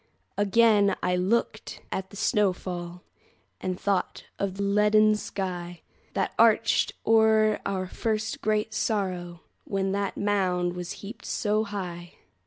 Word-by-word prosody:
Again 205 0 +4
I 180 0 +2
looked 190 +6 -1
at 190 0 -3
the - - -13
snow 205 -1 +2
fall, 175 -1 -7 0.6
And 185 -1 -3
thought 200 -2 -1 0.2
of 195 -2 -2
the 200 - -2
leaden 210 +1 +4
skyThat 180 -4 -5
arched 230 0 +4
o'er 220 -1 +4
our 190 -1 -2
first 215 +3 -2
great 215 0 0
sorrow, 185 -5 -2 0.2
When 195 -1 -1
that 200 0 -2
mound 185 -3 0
was 180 -1 -6
heaped 210 +5 -9
so 215 0 0
high. 180 -4 -6
200 Hz, 125 wpm, -27 LUFS, 180-215 Hz, 0.6 s, Again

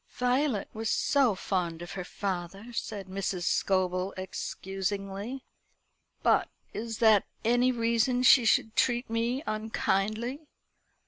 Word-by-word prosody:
"Violet 250 -2 +1
was 220 0 -3
so 265 -7 +3
fond 175 -3 -2
of 175 - -8
her 190 - -4
father," 195 +4 -5
said 205 -3 -4
Mrs. 190 -1 -3
Scobel 185 0 +1
excusingly. 195 +5 -4 0.8
"But - - +3 0.2
is 225 +1 -4
that 220 -3 +5 0.2
any 245 +2 +4
reason 235 +1 +1
she 250 0 +7
should 220 -1 +2
treat 240 -2 +1
me 235 +5 0
unkindly? 215 +5 -1
215 Hz, 115 wpm, -29 LUFS, 195-240 Hz, 0.8 s, she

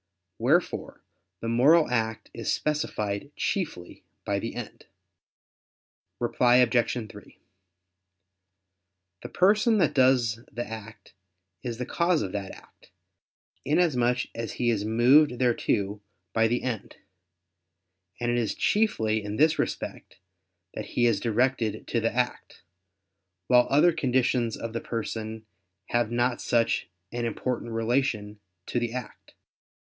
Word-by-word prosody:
Wherefore 145 +10 0 0.4
the 115 - -4
moral 140 +8 +5
act 110 -2 -2
is - - -3
specified 110 -7 -2
chiefly 155 - -3 0.2
by - - 0
the - - -5
end. - - -8 1.3
Reply 120 0 +3
Obj. 120 -2 +2
3: 105 -1 -14 1.8
The - - -7
person 210 +4 +3
that 190 - +2
does 125 -4 +3
the 120 - -4
act 110 -3 -10 0.5
is 120 -2 -4
the 125 - -3
cause 170 +3 +1
of 95 - -4
that 100 -1 -4
act, - - -16 0.7
inasmuch 130 -6 +2
as 115 -1 -5
he 120 -1 +1
is 105 -3 -1
moved 125 +5 +4
thereto 105 -4 0 0.3
by 115 0 +3
the 120 +2 -1
end; 115 -6 -4 1.2
and 120 0 0
it 120 - +1
is 110 -4 -1
chiefly 110 - +1
in 105 +1 -4
this 155 +5 +3
respect - - -4 0.6
that - - -5
he 120 - +4
is 115 -4 +3
directed 120 0 0
to 120 - +1
the 115 0 0
act; 125 +1 -3 0.8
while 125 +5 +5
other 155 +5 +5
conditions 125 -5 +1
of 115 0 -6
the 115 - -3
person 110 -1 -5 0.4
have 120 -2 +1
not 120 +1 0
such 115 -5 +1 0.2
an 120 0 -3
important 120 +1 -3
relation 115 -2 -1 0.3
to 120 - -1
the 120 -1 -2
act. 125 0 -8
120 Hz, 125 wpm, -27 LUFS, 110-130 Hz, 1.8 s, moral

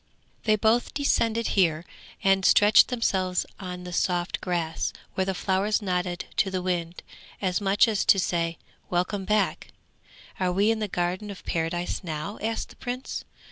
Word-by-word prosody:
They 215 -1 +4
both 220 +5 +1
descended 230 -5 +1
here 165 -4 +2 0.4
and 195 0 +3
stretched 205 +3 +6
themselves 190 -7 0
on 180 -2 -6
the 180 0 -7
soft 175 0 0
grass, 170 -3 -2 0.2
where 190 -2 0
the 190 0 -2
flowers 195 +3 +1
nodded 180 -3 -2
to 195 - +3
the 185 -1 -3
wind, 175 -2 -2 0.4
as 185 0 0
much 200 +3 +4
as 215 -3 +1
to - - +6
say, 170 -2 0 0.3
'Welcome 185 +2 -1
back.' 210 0 +1 0.7
'Are 185 -1 +1
we 200 +4 +3
in 225 - -1
the 215 - -1
Garden 180 +3 -2
of 200 - -9
Paradise 175 +3 -2
now?' 160 +4 -5
asked 225 +1 -2
the - - -16
Prince. 250 +1 -5
190 Hz, 160 wpm, -26 LUFS, 180-210 Hz, 0.7 s, stretched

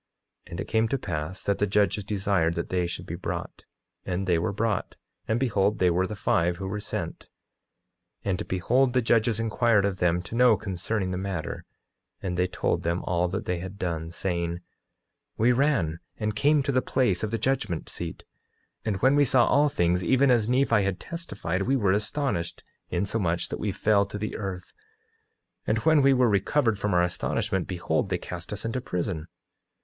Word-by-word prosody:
9:13 - - -17
And 85 - -6
it - - -4
came 110 0 +2
to 135 - 0
pass 90 - -4
that 100 - 0
the 105 - +2
judges 105 0 +2
desired 95 -4 +1
that 85 - -3
they 90 -1 0
should 85 - -6
be - - -6
brought; - - -5 0.4
and 95 +1 -2
they 90 -3 +2
were 85 - -1
brought, 105 0 -1 0.3
and 110 +2 +1
behold 105 -5 +1
they 90 -1 +3
were 90 +2 +1
the 105 - -5
five 85 -3 +1
who 95 - -5
were 105 +2 -3
sent; - - -5 1.0
and 95 -2 -1
behold 125 +8 +2
the 130 - +3
judges 115 -1 +2
inquired 115 -2 +2
of 95 -2 -2
them 90 0 +2
to 90 - -9
know, 120 -2 +5
concerning 95 0 -2
the 90 - -2
matter, 95 -4 -4 0.5
and 90 -2 -3
they 90 +1 +2
told - - -1
them 85 +2 -1
all 90 0 +1
that 95 +4 -3
they 90 -1 -1
had 95 +2 -7
done, 80 -3 -3
saying: 85 -1 -2
9:14 85 - -7 0.8
We 115 +3 +4
ran 120 - +1 0.2
and 105 -1 -2
came 145 +5 +3
to 140 - 0
the 130 -1 +2
place 120 -11 +1
of 110 - -1
the 115 - -1
judgment 115 -8 -1
seat, 85 -2 -6 0.6
and 110 -3 -1
when 135 +2 +5
we 145 - +5
saw 125 -2 +4
all 145 +2 +4
things 90 -6 +1
even 130 +7 +4
as 115 -2 +3
Nephi 125 -4 +3
had 95 -2 -1
testified, 100 - -4
we 130 +7 +2
were 100 -7 +2
astonished 105 - -1 0.3
insomuch 90 -2 -1
that - - -4
we 105 - -1
fell 100 +1 +2
to 105 - -6
the 105 +1 -4
earth; 95 -3 -5 0.9
and - - +2
when 160 -2 +6
we 135 0 +5
were 125 -1 +4
recovered 110 +2 +2
from 100 -2 0
our 90 - +4
astonishment, 95 +2 -1
behold 90 -2 -1
they - - +1
cast - - -7
us - - -4
into 115 +3 -2
prison. 90 -7 -3
100 Hz, 195 wpm, -27 LUFS, 90-115 Hz, 1.0 s, when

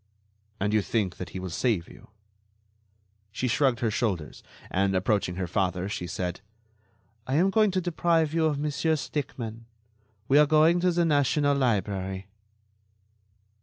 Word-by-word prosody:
"And 105 +2 0
you 110 - +4
think 100 -3 -1
that 90 - -6
he 95 - -6
will 90 -1 -6
save 105 -2 0
you?" - - -16 1.2
She 125 - -2
shrugged 125 -1 +1
her 115 -2 +1
shoulders, 100 -10 -2 0.3
and, 95 0 +1
approaching 95 -1 0
her 95 0 -2
father, 90 0 -1
she 90 -3 -4
said: 90 +1 -4 0.9
"I 130 - 0
am 185 +5 +3
going 215 +1 +4
to 185 0 0
deprive 165 -2 +1
you 165 -1 +2
of 150 -2 -1
Monsieur 150 +2 0
Stickmann. 115 -6 -5 0.6
We 140 +2 +5
are 150 - +6
going 155 +3 +4
to 180 +1 +2
the 175 0 +1
National 145 -1 +2
Library." 100 -6 -1
120 Hz, 150 wpm, -27 LUFS, 95-155 Hz, 1.2 s, are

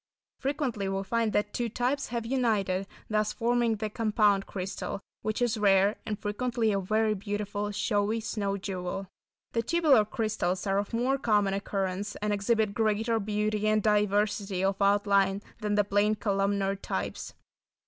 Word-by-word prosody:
Frequently 265 -8 -1
we 195 0 -1
find 230 +2 0
that 210 0 0
two 240 -1 -1
types 255 +5 -1
have 235 -1 -3
united, 215 -7 0 0.2
thus 215 0 +1
forming 235 -1 +1
the 215 +1 -3
"compound" 210 -3 +2
crystal, 190 +1 -4 0.2
which 215 +3 -1
is 230 -2 0
rare, 200 0 +4
and 210 - -2
frequently 225 +2 -1
a 200 - +1
very 215 +3 +1
beautiful, 205 0 -3
showy 205 +1 0
snow 205 -2 -2
jewel. 190 0 -4 0.5
The 230 - +1
tubular 290 -3 +4
crystals 215 -5 -1
are 195 0 +2
of 205 - -4
more 250 +4 +1
common 205 -5 +2
occurrence 195 0 -2
and 210 0 -1
exhibit 210 +1 +1
greater 220 +1 +1
beauty 210 0 -1
and 215 -1 +2
diversity 205 -2 +1
of 195 +1 0
outline 200 0 +3 0.2
than 210 -1 -1
the 205 - +4
plain 205 +2 +2
columnar 200 -1 0
types. 200 - -4
210 Hz, 150 wpm, -29 LUFS, 200-225 Hz, 0.5 s, rare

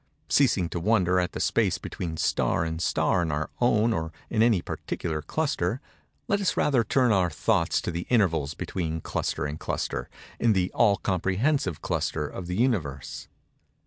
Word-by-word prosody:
Ceasing 115 -11 +3
to 85 +1 -4
wonder 90 -1 +2
at 90 - -1
the - - -4
space - - +2
between 80 -2 -5
star 80 +1 +1
and 80 0 -3
star 90 - +2
in 85 -2 -1
our 75 +1 -2
own 115 -1 +3
or 80 -2 -2 0.2
in 110 - +2
any 115 -4 +4
particular 80 -2 -4
cluster, 130 - -1 0.5
let 200 -3 +1
us 195 - 0
rather 130 -5 +3
turn 125 +2 +2
our 95 -4 +3
thoughts 85 +2 +1
to - - -3
the 85 +1 -4
intervals 80 - +2
between 80 -3 -3
cluster 75 - -2
and 75 +1 -4
cluster, - - -3 0.3
in 115 -2 +4
the 95 -2 0
all 105 -4 +4
comprehensive 95 - 0
cluster 75 -1 -1
of 90 +3 -7
the 90 - -3
Universe. 85 - -1
90 Hz, 170 wpm, -26 LUFS, 80-115 Hz, 0.5 s, any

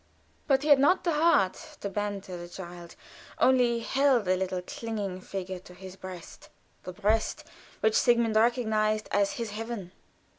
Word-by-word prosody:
But 270 -1 +3
he 305 - -1
had 285 -2 +7
not 290 +7 +4
the 345 - +1
heart 300 - +2
to - - -2
banter 200 -2 -4
the 175 0 -7
child; 175 -1 -9 0.4
only 245 -2 +3
held 265 -2 +2
the 185 0 +2
little 185 -1 -2
clinging 205 -3 -5
figure 185 -1 -5
to 180 0 -15
his 185 0 -10
breast; 185 -3 -10 0.3
the 180 - -7
breast 210 +4 0 0.4
which 220 0 +3
Sigmund 235 -1 +3
recognized 220 -2 +2
as 200 -1 +2
his 230 -3 -4
heaven. 215 -4 -6
210 Hz, 155 wpm, -28 LUFS, 185-235 Hz, 0.4 s, had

